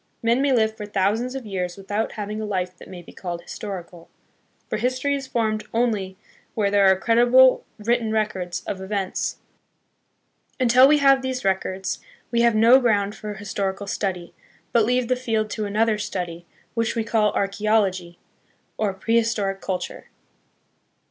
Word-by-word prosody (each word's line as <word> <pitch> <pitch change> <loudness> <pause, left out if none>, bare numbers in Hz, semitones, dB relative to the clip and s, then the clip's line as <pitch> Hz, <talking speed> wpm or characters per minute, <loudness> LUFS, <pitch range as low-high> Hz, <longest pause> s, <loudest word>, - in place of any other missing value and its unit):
Men 235 +3 +3
may 280 0 +2
live 220 -3 +2
for 210 -1 -7
thousands 210 +6 0
of 265 -3 -5
years 180 -3 -3
without 205 +3 -3
having 210 0 -4
a - - -3
life 185 -3 -2
that - - -13
may 180 -2 -10
be - - -14
called 175 -2 -6
his - - -11
torical; 175 -4 -7 0.6
for - - -2
history 255 +4 0
is 275 -1 -3
formed 215 -3 -1
only 210 -6 0 0.4
where 205 -3 +1
there 200 -1 +5
are - - +4
credible 245 +4 +5
written 225 +1 0
records 195 -5 -2
of 190 - -5
events. 190 -1 -2 1.2
Until 255 +1 +6
we 300 +1 +5
have 275 -2 +5
these 260 -3 -3
records, 190 0 -1 0.3
we 235 -1 +2
have 235 -1 +4
no 230 +4 +7
ground 205 -5 +1
for 210 -1 -7
historical 200 0 -3
study, 180 -4 -3 0.4
but 230 -2 +4
leave 250 +1 +1
the 255 - +2
field 220 -4 -1
to 215 - -3
another 215 +1 +1
study, 175 -4 -5 0.3
which 230 -1 -1
we 230 - 0
call 220 -2 +2
Archeology, 195 -3 0 0.6
or 205 -3 -1
Pre 225 +4 +1
historic 210 -4 0
Culture. 185 -1 -4
215 Hz, 160 wpm, -23 LUFS, 190-235 Hz, 1.2 s, no